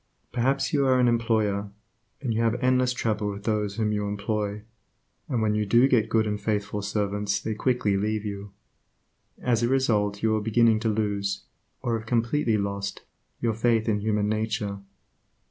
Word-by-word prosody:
Perhaps 135 +4 0
you 140 -2 +3
are 130 -1 +4
an 125 - +4
employer, 110 -4 +1 0.5
and 125 -5 -1
you 110 - 0
have 115 0 +2
endless 130 0 +2
trouble 110 -4 -1
with 100 0 -6
those 105 -2 -1
whom 110 -1 0
you 105 -1 -1
employ, 105 0 -2 0.7
and 120 -5 0
when 105 -1 +2
you 105 0 +1
do 120 +5 +5
get 120 -5 +2
good 110 -1 +2
and 105 -1 -2
faithful 105 -1 -1
servants 100 0 -1
they 110 - -3
quickly 110 -2 +1
leave 105 +2 -1
you. 100 -1 -6 0.9
As 120 -2 +2
a 120 - +2
result 105 -6 +1
you 110 -1 +3
are 110 - 0
beginning 115 0 +3
to 115 0 0
lose, 100 -2 -1 0.4
or 115 -1 0
have 110 - -12
completely 115 0 +1
lost, 100 0 -3 0.4
your 115 -2 +1
faith 115 0 +1
in 105 -2 +1
human 105 0 0
nature. 110 -2 -2
110 Hz, 175 wpm, -26 LUFS, 105-115 Hz, 0.9 s, do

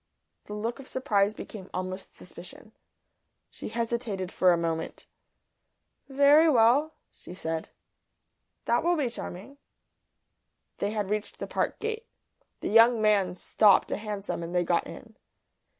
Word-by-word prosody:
The 210 - -7
look 230 +5 -3
of 270 - -11
surprise 215 -5 +1
became 195 -3 -9
almost 185 +1 -5
suspicion. 180 +4 -12 0.8
She - - -8
hesitated 230 -5 -3
for 185 - +4
a 170 - +3
moment. 165 -1 -3 1.0
"Very 285 +4 +6
well," 270 +4 +4 0.2
she 180 - -12
said. 160 -3 -4 1.0
"That 240 +4 +2
will 350 +1 +3
be 275 -7 -1
charming." 230 +6 -8 1.2
They 200 - 0
had 210 -2 -3
reached 210 0 -3
the - - -5
Park - - -2
gate. 450 +1 -4 0.5
The - - -2
young 230 +2 +6
man 200 -4 +2
stopped 200 +2 +3
a - - -1
hansom 205 -4 -5
and 170 +1 -6
they 175 - +3
got 170 0 0
in. - - -12
210 Hz, 135 wpm, -28 LUFS, 185-245 Hz, 1.2 s, Very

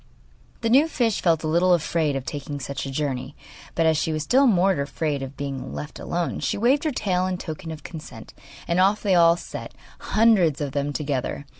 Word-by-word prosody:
The 230 - 0
new 280 +6 +6
fish 235 -9 0
felt 165 -3 +2
a - - -1
little 175 +3 +4
afraid 160 -3 0
of 135 -1 -4
taking 145 0 -5
such 140 0 -5
a - - -5
journey; 135 -1 -3 0.4
but 165 - +2
as 160 -1 +3
she 160 - -1
was 155 -1 -2
still 265 - +4
more 195 -3 +4
afraid 145 0 -2
of 135 0 -7
being 140 -2 -5
left 150 - -7
alone, 175 0 -2
she - - -1
waved 260 +8 +2
her 310 - +1
tail 185 -7 0
in 185 -1 -2
token 160 -2 -7
of 155 -2 -7
consent, 145 -9 -10 0.3
and 170 +1 +1
off 200 +3 +3
they 200 -3 +2
all 170 -1 +5
set, - - -8 0.2
hundreds 205 -9 +3
of 145 -2 -3
them 145 +1 -1
together. 140 -1 -3
160 Hz, 205 wpm, -24 LUFS, 145-185 Hz, 0.4 s, new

